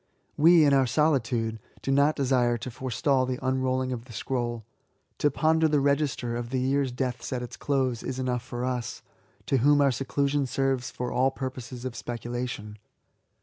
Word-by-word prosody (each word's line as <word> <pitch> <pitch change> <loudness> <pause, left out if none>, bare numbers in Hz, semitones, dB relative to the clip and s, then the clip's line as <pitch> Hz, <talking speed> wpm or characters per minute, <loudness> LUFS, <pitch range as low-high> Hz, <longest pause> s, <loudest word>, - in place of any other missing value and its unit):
We, 165 +1 +6
in 140 - +4
our 135 -2 +4
solitude, 120 -6 +1 0.2
do 135 - -1
not 140 +3 +4
desire 125 -3 +2
to 125 +3 -6
forestal 130 +2 0
the 130 -1 -2
unrolling 130 0 0
of 120 -2 -5
the 120 - -12
scroll. 120 0 -3 0.5
To 145 - +3
ponder 160 +3 +2
the 150 -1 +2
register 140 -4 0
of 120 0 -4
the 130 0 -1
year's 135 +1 +1
deaths 125 -1 -3
at 125 -1 -2
its 125 0 -7
close, 130 -4 0
is 130 - -4
enough 125 -2 -1
for 120 0 -5
us, 125 -2 -3 0.4
to 135 - +2
whom 145 +4 +4
our 140 -1 +4
seclusion 140 +2 0
serves 135 -1 0
for 125 0 -4
all 130 +1 +3
purposes 130 -2 -6
of 125 -2 -4
speculation. 120 -3 -5
130 Hz, 175 wpm, -27 LUFS, 120-140 Hz, 0.5 s, We